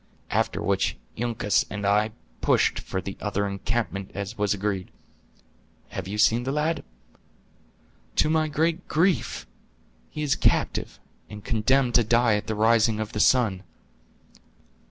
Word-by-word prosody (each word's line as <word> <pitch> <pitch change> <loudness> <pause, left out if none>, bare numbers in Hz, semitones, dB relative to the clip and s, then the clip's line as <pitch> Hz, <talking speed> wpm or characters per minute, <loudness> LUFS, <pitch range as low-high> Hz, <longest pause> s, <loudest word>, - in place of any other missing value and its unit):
After - - 0
which - - 0 0.2
Uncas 110 -4 +1
and 100 0 -4
I 105 +2 +3 0.3
pushed - - +2
for 95 - -4
the 95 +1 -6
other 100 -1 -1
encampment 100 0 -3
as 100 0 -4
was 105 -1 0
agreed. 100 -2 -2 1.0
Have - - -6
you 105 +2 -4
seen 115 +2 +4
the 130 +2 -2
lad?" 155 +3 -1 1.3
"To - - +3
my 155 0 +2
great 160 +3 -1
grief! 175 +3 +1 0.6
He 150 - -5
is 140 -2 +2
captive, - - 0 0.3
and 105 -1 -10
condemned 125 +2 +2
to 120 - +5
die 115 +1 +3
at 105 +1 -3
the 110 - -2
rising 110 0 +3
of 110 0 -3
the 105 - -4
sun." 105 -5 +3
110 Hz, 140 wpm, -25 LUFS, 105-130 Hz, 1.3 s, to